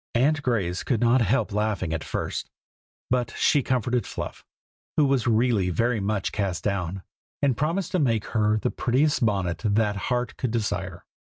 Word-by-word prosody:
Aunt 145 +5 +3
Grace 100 -9 0
could 120 -5 0
not 120 +2 +4
help 115 +3 +1
laughing 105 -5 -1
at 80 - -2
first; - - -4 0.6
but 125 -2 0
she 145 - +4
comforted 125 -2 0
Fluff, - - -6 0.5
who 150 - +5
was 135 -4 +1
really 110 -4 +2
very 115 +6 +1
much 100 -1 -1
cast 100 -4 -2
down, 95 -2 -2 0.4
and 135 -3 +3
promised 165 +7 -1
to 185 - +1
make 115 -8 +1
her 110 -1 +3
the 120 +3 -1
prettiest 140 +3 +1
bonnet 95 -6 0
that 105 -1 +2
heart 125 -2 -1
could 130 - -1
desire. 100 -5 -3
115 Hz, 165 wpm, -25 LUFS, 100-125 Hz, 0.6 s, who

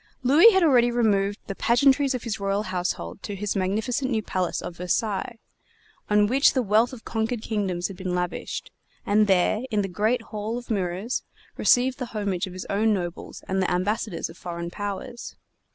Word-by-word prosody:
Louis 295 - +8
had 380 -4 +3
already 250 -6 +5
removed 205 -4 +1
the 195 - -4
pageantries 270 +5 +3
of 250 - -5
his 220 -3 -3
royal 200 +1 0
household 180 - -3
to 205 - -5
his 205 +1 -3
magnificent 220 +8 -1
new 220 -4 0
palace 185 -3 -1
of 170 - -7
Versailles, 205 +5 -1 0.7
on 210 0 +4
which 265 +6 +4
the 260 - +1
wealth 220 +3 +3
of 255 -3 -11
conquered 225 0 -2
kingdoms 190 -5 -1
had 195 - -10
been 185 -1 -3
lavished, 180 0 -4 0.3
and 210 +1 +3
there, 190 +3 +3
in 210 -3 +1
the - - -2
Great 215 +6 0
Hall 215 +2 -3
of 245 -1 -7
Mirrors, 190 +3 -1 0.3
received 255 +2 +3
the 250 - -3
homage 195 -2 -1
of 185 - -9
his 185 - -6
own 215 +2 +2
nobles 175 -2 -6
and 190 0 0
the 185 - +1
ambassadors 195 +1 -1
of 165 - -14
foreign 170 -1 -5
powers. 205 +5 -6
210 Hz, 185 wpm, -25 LUFS, 185-240 Hz, 0.7 s, Louis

